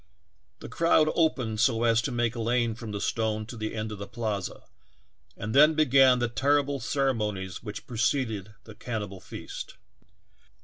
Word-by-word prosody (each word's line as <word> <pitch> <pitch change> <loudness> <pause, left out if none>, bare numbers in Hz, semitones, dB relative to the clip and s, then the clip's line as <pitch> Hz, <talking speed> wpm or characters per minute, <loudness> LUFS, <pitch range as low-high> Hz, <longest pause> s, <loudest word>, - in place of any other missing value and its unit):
The - - -7
crowd 160 -2 +3
opened 125 -10 0
so 115 -1 +2
as 115 0 +4
to - - -3
make 120 -1 0
a 115 - -3
lane 120 0 +1
from 115 -1 -8
the 100 - -4
stone 110 0 -1
to 120 - -9
the 110 -1 -4
end 110 0 -3
of 105 - -7
the 100 - -6
plaza, 110 -5 -4 0.7
and 105 +2 -4
then 150 +3 +6
began 135 -4 +5
the 120 0 0
ter 135 +5 +2
rible 140 -1 -4
ceremonies 105 -9 -1
which 105 -2 -7
preceded 110 -3 -1
the 110 - -12
cannibal 105 -4 -5
feast. - - -8
115 Hz, 170 wpm, -27 LUFS, 110-130 Hz, 0.7 s, then